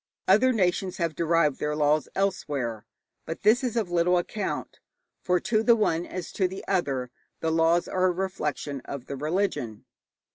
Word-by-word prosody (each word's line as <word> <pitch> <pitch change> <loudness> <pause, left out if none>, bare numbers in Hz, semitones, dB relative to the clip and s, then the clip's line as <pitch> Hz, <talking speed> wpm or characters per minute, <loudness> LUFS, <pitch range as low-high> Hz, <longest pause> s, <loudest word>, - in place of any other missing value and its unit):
Other 215 +7 +5
nations 185 -4 0
have 170 -3 -1
derived 165 -2 +2
their 150 0 -1
laws 150 0 +2
elsewhere. 135 - -2 0.4
But 165 - -6
this 220 +5 +4
is 245 -2 -1
of 215 -7 -1
little 175 +1 +3
account, 205 +4 -3 0.4
for 180 -1 +2
to 215 +3 +1
the 235 +1 +5
one, 175 -6 0
as 185 -2 -6
to 190 - +1
the 190 +1 -8
other, 135 -10 -1 0.3
the 160 - -1
laws 165 +1 +3
are 185 0 +1
a 185 - +4
reflection 155 -6 -3
of 140 -3 -6
the 140 - -5
religion. 150 - -2
175 Hz, 170 wpm, -26 LUFS, 150-190 Hz, 0.4 s, Other